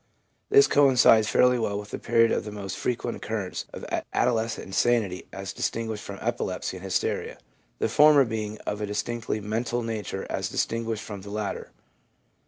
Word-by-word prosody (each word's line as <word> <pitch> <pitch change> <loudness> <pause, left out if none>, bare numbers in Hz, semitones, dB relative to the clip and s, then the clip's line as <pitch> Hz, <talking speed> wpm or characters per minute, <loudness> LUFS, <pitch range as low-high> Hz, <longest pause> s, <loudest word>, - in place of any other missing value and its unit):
This 420 0 +7
coincides 125 -6 +5
fairly 125 +2 +4
well 100 -3 -1
with 105 0 -7
the - - -4
period 115 0 +3
of - - 0
the 105 - -7
most 100 -2 -5
frequent 120 -1 -2
occurrence 105 -4 -4
of - - -8 0.3
adolescent 115 -2 0
insanity 100 -2 0
as 95 -1 -6
distin 115 0 -2
guished 110 -1 -4
from 100 -1 -8
epilepsy 95 - -2
and 90 - -12
hysteria, 95 -2 -1 0.4
the - - 0
former 150 -2 +6
being 110 -2 -4
of 105 +1 -3
a 105 - -2
distinctly 110 +2 -2
mental 115 +3 -2
nature 110 -4 -4
as - - -2
distinguished 115 -1 -2
from 100 -3 -7
the 100 - -10
latter. 105 0 -4
110 Hz, 170 wpm, -26 LUFS, 105-120 Hz, 0.4 s, This